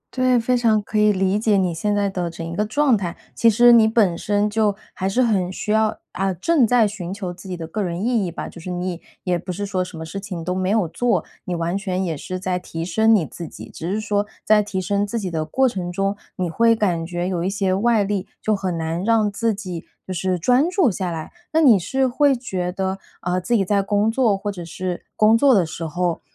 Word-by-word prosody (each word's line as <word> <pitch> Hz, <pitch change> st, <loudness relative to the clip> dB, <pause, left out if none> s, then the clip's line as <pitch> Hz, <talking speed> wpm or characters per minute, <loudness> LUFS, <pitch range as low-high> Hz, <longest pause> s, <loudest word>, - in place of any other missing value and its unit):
对， 255 Hz, -1 st, +3 dB
非 250 Hz, +2 st, +1 dB
常 225 Hz, -3 st, +3 dB
可 210 Hz, +1 st, -2 dB
以 210 Hz, 0 st, +5 dB
理 195 Hz, +1 st, +1 dB
解 215 Hz, -2 st, +2 dB
你 180 Hz, -3 st, +1 dB
现 205 Hz, +5 st, -1 dB
在 200 Hz, -1 st, +1 dB
的 180 Hz, -3 st, -2 dB
整 165 Hz, 0 st, -7 dB
一 165 Hz, +1 st, -5 dB
个 210 Hz, 0 st, 0 dB
状 280 Hz, +1 st, +3 dB
态。 175 Hz, -4 st, -3 dB, 0.2 s
其 230 Hz, -, +4 dB
实 240 Hz, +3 st, +6 dB
你 225 Hz, -2 st, +7 dB
本 215 Hz, -6 st, +3 dB
身 205 Hz, +3 st, 0 dB
就 210 Hz, -1 st, +1 dB, 0.2 s
还 190 Hz, +1 st, -2 dB
是 250 Hz, +6 st, +2 dB
很 190 Hz, -6 st, +1 dB
需 210 Hz, -, -4 dB
要 220 Hz, 0 st, +2 dB
啊， 195 Hz, 0 st, -1 dB
正 270 Hz, -, +3 dB
在 235 Hz, -3 st, +4 dB
寻 185 Hz, -4 st, -6 dB
求 190 Hz, -3 st, -5 dB
自 185 Hz, +2 st, -12 dB
己 180 Hz, -, -4 dB
的 165 Hz, -, -5 dB
个 205 Hz, +6 st, -4 dB
人 180 Hz, +2 st, -2 dB
意 235 Hz, -4 st, +2 dB
义 175 Hz, -, -2 dB
吧。 165 Hz, -, -6 dB
就 170 Hz, -, -11 dB
是 180 Hz, -, -7 dB
你 180 Hz, -1 st, -3 dB, 0.2 s
也 180 Hz, -2 st, 0 dB
不 180 Hz, -, -6 dB
是 200 Hz, +3 st, -3 dB
说 185 Hz, -2 st, -1 dB
什 180 Hz, -, -9 dB
么 160 Hz, -, -6 dB
事 180 Hz, +5 st, -6 dB
情 185 Hz, -4 st, -6 dB
都 180 Hz, -, -2 dB
没 185 Hz, 0 st, -1 dB
有 205 Hz, -4 st, +2 dB
做， 240 Hz, +8 st, 0 dB, 0.2 s
你 180 Hz, -2 st, -2 dB
完 170 Hz, +2 st, -1 dB
全 190 Hz, -2 st, -2 dB
也 165 Hz, -3 st, -2 dB
是 185 Hz, +5 st, -5 dB
在 185 Hz, -1 st, -1 dB
提 165 Hz, -1 st, -6 dB
升 220 Hz, +5 st, +4 dB
你 175 Hz, -, +1 dB
自 170 Hz, +1 st, -8 dB
己。 -, -, -11 dB
只 170 Hz, +3 st, -5 dB
是 210 Hz, -, 0 dB
说 205 Hz, -1 st, -1 dB, 0.2 s
在 215 Hz, -1 st, +5 dB
提 200 Hz, -2 st, -3 dB
升 200 Hz, +2 st, 0 dB
自 230 Hz, +3 st, -2 dB
己 185 Hz, -4 st, -4 dB
的 160 Hz, -1 st, -1 dB
过 265 Hz, +12 st, +2 dB
程 180 Hz, -6 st, -3 dB
中， 195 Hz, +2 st, -1 dB, 0.2 s
你 185 Hz, -, -1 dB
会 230 Hz, +7 st, +3 dB
感 180 Hz, -7 st, 0 dB
觉 175 Hz, 0 st, -3 dB
有 175 Hz, -2 st, -1 dB
一 190 Hz, -, 0 dB
些 195 Hz, -2 st, 0 dB
外 220 Hz, +2 st, +2 dB
力， 200 Hz, -1 st, -2 dB
就 215 Hz, -1 st, +1 dB
很 185 Hz, -3 st, -2 dB
难 165 Hz, +2 st, -2 dB
让 215 Hz, -1 st, +2 dB
自 225 Hz, +2 st, 0 dB
己 180 Hz, -5 st, -6 dB, 0.2 s
就 185 Hz, -, -3 dB
是 185 Hz, +1 st, -1 dB
专 250 Hz, -, +3 dB
注 360 Hz, -, +3 dB
下 185 Hz, -1 st, -3 dB
来。 160 Hz, -2 st, -5 dB, 0.2 s
那 320 Hz, -, +4 dB
你 235 Hz, -10 st, +6 dB
是 265 Hz, +8 st, 0 dB
会 275 Hz, +2 st, +3 dB
觉 185 Hz, -7 st, -3 dB
得， 190 Hz, +1 st, -2 dB, 0.2 s
啊， 180 Hz, +1 st, 0 dB
自 235 Hz, +7 st, 0 dB
己 195 Hz, -3 st, +2 dB
在 200 Hz, +1 st, +2 dB
工 205 Hz, +2 st, +1 dB
作 225 Hz, -5 st, +2 dB
或 205 Hz, +1 st, -3 dB
者 175 Hz, -3 st, -7 dB
是 180 Hz, +2 st, -5 dB
工 215 Hz, +1 st, +5 dB
作 265 Hz, 0 st, +5 dB
的 180 Hz, -4 st, +3 dB
时 165 Hz, +1 st, -7 dB
候， 175 Hz, +2 st, -1 dB
195 Hz, 270 characters per minute, -21 LUFS, 180-220 Hz, 0.2 s, 你